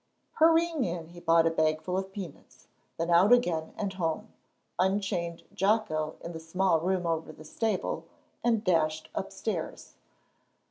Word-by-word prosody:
Hurrying 325 Hz, -2 st, +4 dB
in 170 Hz, -4 st, -3 dB
he 175 Hz, 0 st, -11 dB
bought 165 Hz, -1 st, +4 dB
a 165 Hz, -, +3 dB
bagful 160 Hz, +2 st, 0 dB
of 190 Hz, 0 st, -2 dB
peanuts; 190 Hz, -7 st, -9 dB, 0.3 s
then 165 Hz, +1 st, -1 dB
out 180 Hz, +6 st, +6 dB
again 175 Hz, -10 st, +3 dB
and 200 Hz, -2 st, -2 dB
home 185 Hz, +4 st, -3 dB, 0.5 s
unchained 185 Hz, -3 st, 0 dB
Jocko 185 Hz, -7 st, +1 dB
in 170 Hz, -, -6 dB
the 165 Hz, -, -6 dB
small 165 Hz, +1 st, +1 dB
room 180 Hz, +1 st, 0 dB
over 165 Hz, -1 st, -1 dB
the 155 Hz, -, -13 dB
stable, 205 Hz, +3 st, -2 dB, 0.4 s
and 230 Hz, -3 st, +2 dB
dashed 155 Hz, -4 st, +1 dB
upstairs. -, -, -4 dB
175 Hz, 140 wpm, -29 LUFS, 165-200 Hz, 0.5 s, out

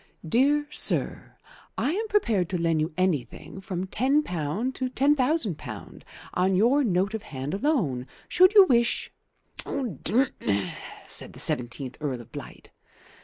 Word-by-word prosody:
"DEAR 285 Hz, -, +3 dB
SIR, -, -, -1 dB, 0.4 s
I 285 Hz, -, +1 dB
am 435 Hz, +6 st, -2 dB
prepared 230 Hz, -, +1 dB
to 185 Hz, -, -1 dB
lend 165 Hz, -2 st, +1 dB
you 155 Hz, -, -1 dB
anything 185 Hz, 0 st, -2 dB
from 185 Hz, -2 st, -4 dB
£10 225 Hz, -, 0 dB
to 255 Hz, -1 st, -2 dB
£10,000 255 Hz, -, 0 dB, 0.3 s
on 185 Hz, +1 st, +2 dB
your 245 Hz, +9 st, +4 dB
note 195 Hz, -2 st, +1 dB
of 220 Hz, -, -3 dB
hand 135 Hz, -2 st, -6 dB
alone. 195 Hz, -, 0 dB, 0.2 s
Should 370 Hz, +3 st, +5 dB
you 405 Hz, -, +11 dB
wish 235 Hz, -5 st, +2 dB, 0.3 s
" -, -, -43 dB
"D 240 Hz, -, 0 dB, 0.2 s
n!" 100 Hz, -3 st, 0 dB, 0.3 s
said -, -, -4 dB
the -, -, -11 dB
seventeenth 125 Hz, +2 st, -1 dB
Earl 135 Hz, -5 st, -2 dB
of 120 Hz, -, -16 dB
Blight. -, -, -10 dB
195 Hz, 140 wpm, -26 LUFS, -, 0.4 s, you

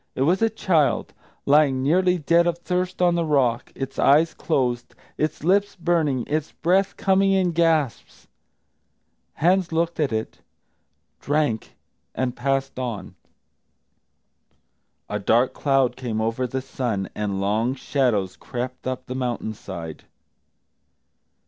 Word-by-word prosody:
It 130 Hz, -, +1 dB
was 180 Hz, +8 st, +2 dB
a 225 Hz, -, +4 dB
child, 165 Hz, -, +1 dB, 0.3 s
lying 140 Hz, -3 st, +4 dB
nearly 180 Hz, +5 st, +3 dB
dead 170 Hz, +2 st, +3 dB
of 170 Hz, -1 st, 0 dB
thirst 180 Hz, +1 st, -2 dB
on 175 Hz, -1 st, +4 dB
the 170 Hz, 0 st, +1 dB
rock, 130 Hz, -6 st, +1 dB
its 135 Hz, 0 st, -5 dB
eyes 155 Hz, +4 st, +4 dB
closed, 125 Hz, -6 st, -1 dB, 0.2 s
its 155 Hz, -1 st, -2 dB
lips 200 Hz, +4 st, +2 dB
burning, 160 Hz, -7 st, 0 dB
its 155 Hz, +1 st, -2 dB
breath 190 Hz, +4 st, +1 dB
coming 195 Hz, 0 st, +3 dB
in 185 Hz, -2 st, +2 dB
gasps. 160 Hz, -6 st, 0 dB, 1.1 s
Hans 180 Hz, +3 st, +2 dB
looked 165 Hz, +1 st, -1 dB
at 150 Hz, -4 st, +1 dB
it, 110 Hz, 0 st, -4 dB, 0.8 s
drank, 145 Hz, -6 st, -1 dB, 0.4 s
and 130 Hz, -1 st, -1 dB
passed 135 Hz, +1 st, -1 dB
on. 120 Hz, -5 st, -5 dB, 1.9 s
A 105 Hz, -, -3 dB
dark 115 Hz, +5 st, +2 dB
cloud 135 Hz, -3 st, +1 dB
came 120 Hz, -4 st, -3 dB
over 115 Hz, +3 st, -1 dB
the 130 Hz, +1 st, -4 dB
sun, 115 Hz, -8 st, -3 dB
and 100 Hz, -2 st, -2 dB
long 110 Hz, +6 st, 0 dB
shadows 120 Hz, -9 st, 0 dB
crept 125 Hz, +1 st, -6 dB
up 130 Hz, -1 st, -3 dB
the 125 Hz, -, -5 dB
mountain 120 Hz, -4 st, -3 dB
side. 85 Hz, -6 st, -8 dB
135 Hz, 130 wpm, -23 LUFS, 120-170 Hz, 1.9 s, a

